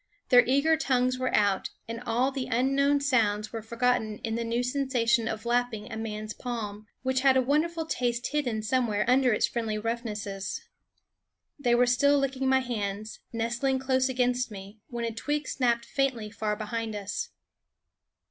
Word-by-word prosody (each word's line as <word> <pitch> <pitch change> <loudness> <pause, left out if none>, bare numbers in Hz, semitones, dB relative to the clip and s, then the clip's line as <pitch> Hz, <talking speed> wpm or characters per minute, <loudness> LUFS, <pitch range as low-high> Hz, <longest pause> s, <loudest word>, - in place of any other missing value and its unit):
Their 245 -1 +8
eager 280 +5 +4
tongues 255 -3 +1
were 255 - 0
out, 200 -2 +2 0.2
and 230 +1 -5
all 245 +4 +2
the 265 -2 -3
unknown 275 +4 +2
sounds 215 -6 +1
were 225 - -3
forgotten 225 -1 0
in 225 - -2
the 235 +1 -1
new 230 +1 -1
sensation 245 -3 +1
of 220 0 -4
lapping 240 -3 -1
a - - -4
man's 215 -1 -4
palm, 215 -4 -5 0.2
which 260 0 +1
had 265 -1 +5
a - - +5
wonderful 320 +5 +1
taste 245 -5 -1
hidden 245 -8 -1
somewhere 220 -2 +1
under 255 0 +4
its 215 - +2
friendly 225 -3 -2
roughnesses. 210 -3 -3 1.0
They 240 -4 +3
were 245 +1 +5
still 280 +4 +4
licking 270 -1 0
my 265 0 +4
hands, 215 -3 -4
nestling 240 +4 0
close 260 0 +1
against 250 0 +1
me, 200 +1 -10
when 235 -1 -4
a 230 - -3
twig 295 +6 -2
snapped 235 -3 +1
faintly 255 -6 -1
far 215 -1 -2
behind 220 0 -4
us. 200 -1 -4
240 Hz, 165 wpm, -28 LUFS, 220-260 Hz, 1.0 s, Their